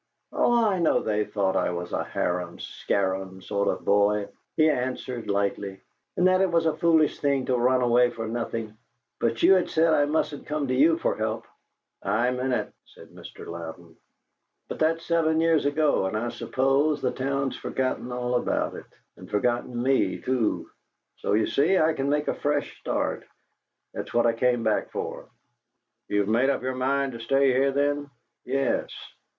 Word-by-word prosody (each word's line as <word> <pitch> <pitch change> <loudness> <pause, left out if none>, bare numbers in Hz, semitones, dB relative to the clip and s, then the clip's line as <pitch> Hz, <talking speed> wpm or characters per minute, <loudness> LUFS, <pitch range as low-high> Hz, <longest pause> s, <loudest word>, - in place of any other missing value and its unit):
"Oh, 240 -1 +3
I 195 -4 +1
know 170 - +2
they 105 -1 0
thought 95 -2 -1
I - - +1
was 90 0 -5
a - - 0
harum 90 -1 -2
scarum 95 -1 -2
sort 100 +2 -2
of - - -2
boy," 105 0 +2 0.3
he 155 - +5
answered 125 -4 -2
lightly, 100 -1 -1 0.4
"and 180 - +3
that 185 0 +4
it 190 -2 +2
was 165 -1 +2
a 160 -1 +1
foolish 160 -2 +3
thing 140 -3 +1
to 130 - +1
run 125 +1 +2
away 120 0 +4
for 115 -2 -6
nothing; 115 -1 -4 0.4
but 115 0 -1
you - - +8
had 185 -2 +2
said 160 0 +3
I 145 -2 +4
mustn't 145 -1 -2
come 150 -2 -2
to - - +1
you 155 +5 +4
for - - 0
help 110 0 -2 0.4
" - - -58 0.2
"I 125 +1 +2
meant 125 +1 -2
it," 125 - -2
said - - -16
Mr. - - -12
Louden. 85 0 -8 0.7
"But - - -6
that's 165 +1 +1
seven 160 -1 +2
years 165 -3 +3
ago, 145 -8 +2
and 110 - -2
I 120 +2 -2
suppose 135 +5 +1
the 130 - 0
town's 135 0 -2
forgotten 130 -1 -3
all 125 0 -2
about 125 - 0
it, - - -9 0.3
and - - -12
forgotten 120 +3 -1
me, 135 +1 +1
too. 125 -4 -1 0.5
So, - - -2
you 110 +1 +3
see, 165 +7 +2
I 160 -1 +3
can 140 -2 -2
make 150 +1 0
a - - +1
fresh 145 0 -2
start. - - -2 0.7
That's - - -6
what 120 0 +4
I 115 - +3
came 120 0 +1
back 110 -1 0
for." - - -6 0.8
"You've 105 -1 0
made 120 +5 +3
up 140 - -1
your 130 0 -1
mind 135 +1 0
to 115 - -8
stay 135 +3 +2
here, 135 +2 +2
then?" 145 +1 0 0.4
"Yes." 135 0 0
130 Hz, 180 wpm, -26 LUFS, 110-145 Hz, 0.8 s, you